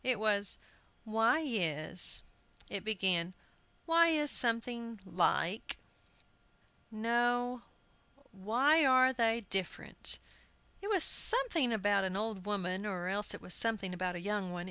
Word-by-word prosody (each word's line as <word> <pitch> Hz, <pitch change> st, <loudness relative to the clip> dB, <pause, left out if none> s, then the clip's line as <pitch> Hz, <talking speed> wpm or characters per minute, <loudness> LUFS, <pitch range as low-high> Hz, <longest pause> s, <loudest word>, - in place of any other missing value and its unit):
It 250 Hz, -4 st, 0 dB
was, 205 Hz, -2 st, +3 dB, 0.5 s
"Why 225 Hz, +7 st, +1 dB
is 175 Hz, -, +1 dB, 0.2 s
" -, -, -24 dB
It 200 Hz, -, -5 dB
began, 185 Hz, -4 st, -2 dB, 0.5 s
"Why 335 Hz, 0 st, +4 dB
is 300 Hz, -3 st, +2 dB
something 230 Hz, -1 st, +1 dB
like 180 Hz, +2 st, -2 dB, 1.1 s
no, 240 Hz, +2 st, -1 dB, 0.7 s
Why 245 Hz, +11 st, +1 dB
are 260 Hz, -1 st, +4 dB
they 230 Hz, -1 st, 0 dB
different?" 195 Hz, -2 st, -3 dB, 0.6 s
It 400 Hz, -, -6 dB
was 385 Hz, -6 st, +4 dB
something 435 Hz, -, +4 dB
about 205 Hz, -2 st, 0 dB
an 190 Hz, 0 st, -4 dB
old 210 Hz, -2 st, -5 dB
woman, 190 Hz, -2 st, -3 dB
or 185 Hz, -4 st, -5 dB
else 205 Hz, +2 st, -2 dB
it -, -, -12 dB
was 180 Hz, -, -3 dB
something 210 Hz, -5 st, 0 dB
about 180 Hz, 0 st, -4 dB
a -, -, -6 dB
young 200 Hz, -1 st, -4 dB
one. 180 Hz, -, -6 dB
215 Hz, 130 wpm, -31 LUFS, 190-245 Hz, 1.1 s, Why